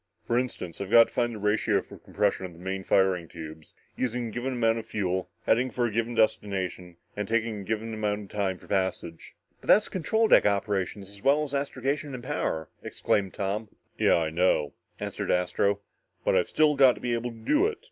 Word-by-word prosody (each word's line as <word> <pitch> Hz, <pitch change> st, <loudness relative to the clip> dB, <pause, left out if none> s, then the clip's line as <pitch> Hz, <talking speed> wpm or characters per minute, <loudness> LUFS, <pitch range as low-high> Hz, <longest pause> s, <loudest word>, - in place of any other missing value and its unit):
"For 120 Hz, +1 st, +2 dB
instance, 100 Hz, -9 st, -5 dB
I've 100 Hz, -, -4 dB
got 115 Hz, +1 st, +7 dB
to -, -, -22 dB
find 120 Hz, -2 st, 0 dB
the -, -, -6 dB
ratio 105 Hz, 0 st, +1 dB
for -, -, -13 dB
compression 95 Hz, -, -1 dB
on 90 Hz, -, -14 dB
the -, -, -16 dB
main 95 Hz, +2 st, -4 dB
firing 95 Hz, -3 st, +2 dB
tubes, 80 Hz, -1 st, -10 dB, 0.2 s
using 125 Hz, -1 st, -2 dB
a -, -, -7 dB
given 125 Hz, +4 st, -3 dB
amount 115 Hz, -2 st, +2 dB
of 115 Hz, -, -9 dB
fuel, 95 Hz, -3 st, -2 dB, 0.2 s
heading 125 Hz, +3 st, +3 dB
for 120 Hz, -1 st, -1 dB
a 120 Hz, -, -1 dB
given 115 Hz, +2 st, -1 dB
destination, 95 Hz, -5 st, 0 dB, 0.2 s
and 105 Hz, -1 st, -3 dB
taking 115 Hz, -1 st, 0 dB
a -, -, -7 dB
given 110 Hz, +2 st, -3 dB, 0.3 s
time 95 Hz, -2 st, -2 dB
for -, -, -17 dB
the -, -, -21 dB
passage." 95 Hz, -4 st, -2 dB, 0.2 s
"But -, -, -16 dB
that's 210 Hz, -, +5 dB
control 220 Hz, +5 st, +1 dB
deck -, -, +6 dB
operations 100 Hz, -1 st, -1 dB
as 100 Hz, -1 st, -12 dB
well 145 Hz, +5 st, +3 dB
as 145 Hz, -2 st, -6 dB
astrogation 140 Hz, 0 st, -2 dB
and 120 Hz, -, -8 dB
power!" 80 Hz, -6 st, -2 dB
exclaimed 100 Hz, -3 st, -1 dB
Tom. 105 Hz, +2 st, -2 dB, 0.3 s
"Yeah -, -, +4 dB
I 80 Hz, -2 st, 0 dB
know," 80 Hz, -4 st, +2 dB, 0.3 s
answered -, -, -4 dB
Astro, 100 Hz, +3 st, +1 dB, 0.4 s
"but -, -, +3 dB
I've -, -, +2 dB
still 155 Hz, -1 st, +3 dB
got 135 Hz, -3 st, +6 dB
to -, -, -11 dB
be 120 Hz, -1 st, -1 dB
able 120 Hz, +1 st, -1 dB
to 115 Hz, -, -11 dB
do 295 Hz, -, +2 dB
it. 445 Hz, -, -4 dB
105 Hz, 210 wpm, -27 LUFS, 95-120 Hz, 0.4 s, got